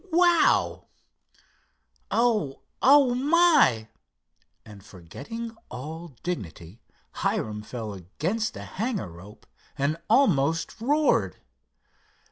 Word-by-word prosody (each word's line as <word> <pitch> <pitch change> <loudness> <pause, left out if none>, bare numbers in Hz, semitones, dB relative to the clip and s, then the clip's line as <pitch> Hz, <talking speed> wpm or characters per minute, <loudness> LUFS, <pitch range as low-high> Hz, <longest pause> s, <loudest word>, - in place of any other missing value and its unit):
Wow! 345 0 +3 1.2
O 220 - 0 0.2
oh, 275 -2 +6
my!" 285 - +4 0.8
and, 105 -3 -13
forgetting 145 - -9
all 155 +4 -8
dignity, 105 - -6 0.4
Hiram 105 -1 -2
fell 110 -1 -6
against 160 - -3
a - - -7
hangar 210 - -4
rope 95 +6 -14 0.3
and 145 +3 0
almost 165 - +2
roared. 295 +5 +1
165 Hz, 85 wpm, -26 LUFS, -, 1.2 s, oh